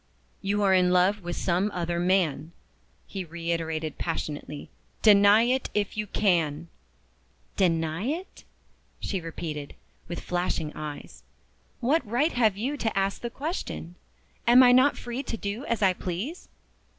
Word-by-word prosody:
"You 205 +1 0
are 195 -1 +4
in 180 -1 +4
love 185 +3 +3
with 175 -1 -4
some 185 +3 +1
other 170 -1 -1
man," 175 -4 +1 0.5
he 195 -2 -5
reiterated 165 -2 -3
passionately. 150 -3 -4 0.3
"Deny 205 +1 +7
it 255 +2 0
if 205 -1 0
you 210 0 -3
can!" 170 -6 +1 0.9
"Deny 165 0 +1
it?" 330 +8 -4 0.6
she 190 -3 -3
repeated, 155 -3 -6 0.3
with 175 - -5
flashing 175 -3 -2
eyes. 150 -1 -8 0.6
"What 275 +5 +2
right 245 +9 +1
have 220 -5 +2
you 265 +7 -2
to 225 -6 -2
ask 195 0 0
the 235 - -3
question? 275 - -5 0.5
Am 245 +2 +8
I 245 - +7
not 255 +3 +5
free 240 +2 -4
to 240 -4 -5
do 205 +7 -4
as 235 -2 -1
I 190 -1 +5
please?" 190 - -5
195 Hz, 140 wpm, -27 LUFS, 170-230 Hz, 0.9 s, Am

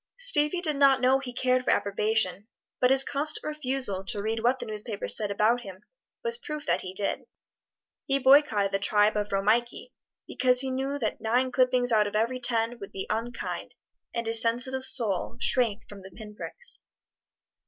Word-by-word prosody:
Stevie 350 -9 +3
did 305 -5 0
not 275 -1 +5
know 260 +1 +3
he 265 -2 -7
cared 255 +1 0
for - - -2
approbation, 205 -1 0 0.3
but 250 - +3
his 270 0 +6
constant 290 +3 0
refusal 265 -10 -3
to 205 +1 -1
read 220 +2 -2
what 245 +3 +1
the - - -7
newspapers 210 0 -3
said 210 -2 -1
about 215 +4 +1
him 195 -2 -11 0.4
was 470 0 -1
proof 300 -6 -7
that 175 +2 0
he 185 - -7
did. 200 +1 -3 0.8
He 275 - +1
boycotted 265 -7 +4
the 195 - 0
tribe 210 +1 +2
of 210 0 -2
Romeike, 215 +5 0 0.4
because 250 -1 +2
he 265 -1 -3
knew 270 +2 -2
that 225 -6 -3
nine 245 +3 0
clippings 250 -1 +2
out 215 -2 +3
of 205 - -7
every 235 +4 0
ten 235 -1 -2
would 200 - -9
be 190 - -6
unkind, 230 +3 -5 0.4
and 235 -1 -4
his 225 0 +2
sensitive 245 +3 0
soul 230 -5 +2
shrank 230 -6 +1
from 205 -1 -12
the 190 - -11
pin 210 +3 -11
pricks. 485 - -6
235 Hz, 180 wpm, -27 LUFS, 210-265 Hz, 0.8 s, his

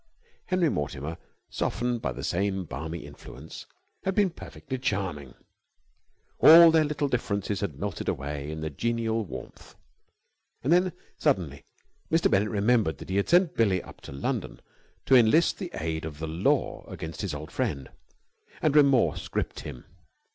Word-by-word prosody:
Henry 185 -3 +2
Mortimer, 75 - -4 0.3
softened 120 +1 -1
by 65 - -1
the 65 +2 -7
same 95 +2 -1
balmy 80 +1 -6
influence, 70 +5 -11 0.4
had 190 0 -1
been 200 -4 +3
perfectly 130 -5 -7
charming. 95 - -3 1.0
All 165 +1 +10
their 160 -1 +4
little 145 -1 -1
differences 100 -6 -1
had 90 -9 -3
melted 100 +2 -3
away 70 +1 -4
in 80 0 -5
the 80 0 -3
genial 115 +5 -1
warmth. 65 -10 -10 0.9
And 145 +7 +3
then 180 0 +3 0.3
suddenly 75 -7 0 0.5
Mr. 165 +1 +3
Bennett 100 +2 +3
remembered 105 -4 +2
that - - -11
he 95 - 0
had 100 - 0
sent 175 -1 +4
Billie 100 -6 +2
up - - -14
to - - -10
London 70 0 -3 0.5
to 135 - +5
enlist 125 +8 +4
the 185 -4 -4
aid 80 0 -3
of 80 -2 -6
the 80 +1 -4
Law 80 +3 0
against 80 +1 -7
his 95 -8 -3
old 75 +1 -8
friend, 70 -2 -2 0.7
and 150 -1 +1
remorse 140 -4 +4
gripped - - -3
him. 60 - -9
100 Hz, 155 wpm, -27 LUFS, -, 1.0 s, All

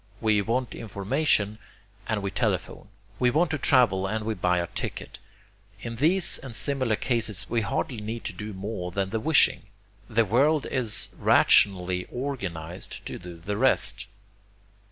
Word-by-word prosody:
We 110 -2 +2
want 120 +5 -1
information 105 0 0 0.5
and 105 -3 -1
we 100 - -2
telephone. - - -2 0.3
We 125 - +4
want 160 +5 +2
to 155 - -1
travel 100 -8 +3
and 110 +1 -3
we 110 - -1
buy 90 -2 +1
a 85 - 0
ticket. - - -6 0.6
In 115 -1 -6
these 170 +7 +3
and 130 -4 -8
similar 130 -5 +1
cases, 110 -4 -2
we 115 - +2
hardly 115 +4 -2
need 110 +2 -5
to 105 - -3
do 105 +4 -6
more 95 -2 -5
than 95 +1 -2
the 110 - -1
wishing 155 +5 +4 0.5
the 115 0 +2
world 140 +8 +2
is 125 -6 -2
rationally 90 -2 +4
organized 95 - -5
to - - -6
do 90 -1 -10
the 100 +5 -4
rest. 130 -4 +2
110 Hz, 155 wpm, -26 LUFS, 95-125 Hz, 0.6 s, We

